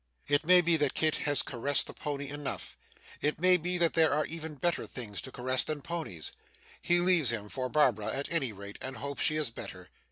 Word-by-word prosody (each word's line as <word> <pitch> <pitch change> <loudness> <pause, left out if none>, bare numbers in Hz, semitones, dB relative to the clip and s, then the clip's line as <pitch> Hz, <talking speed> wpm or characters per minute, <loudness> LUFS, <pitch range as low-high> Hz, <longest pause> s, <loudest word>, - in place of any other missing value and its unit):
It 145 +2 +2
may 180 0 +8
be 170 -1 +4
that 145 -3 0
Kit 155 -1 +1
has 145 -2 +4
caressed 140 +3 0
the - - -8
pony 145 -1 -5
enough; 145 -1 -6 0.5
it 150 +1 -1
may 185 +1 +5
be 180 +1 +2
that 170 -2 +2
there 160 -1 +3
are 150 0 0
even 160 -1 -5
better 170 +5 -1
things 110 -6 -5
to 130 - -8
caress 130 +1 +1
than 150 -2 -4
ponies. 155 - -4 0.5
He 175 - +3
leaves 175 -7 +6
him 105 -3 -1
for 130 +2 -4
Barbara 120 -9 +1
at 135 +5 -2
any 145 -8 0
rate, 100 0 -11
and 130 0 -5
hopes 140 0 -6
she 155 - +3
is 150 -6 -1
better. - - -10
145 Hz, 215 wpm, -29 LUFS, 130-165 Hz, 0.5 s, may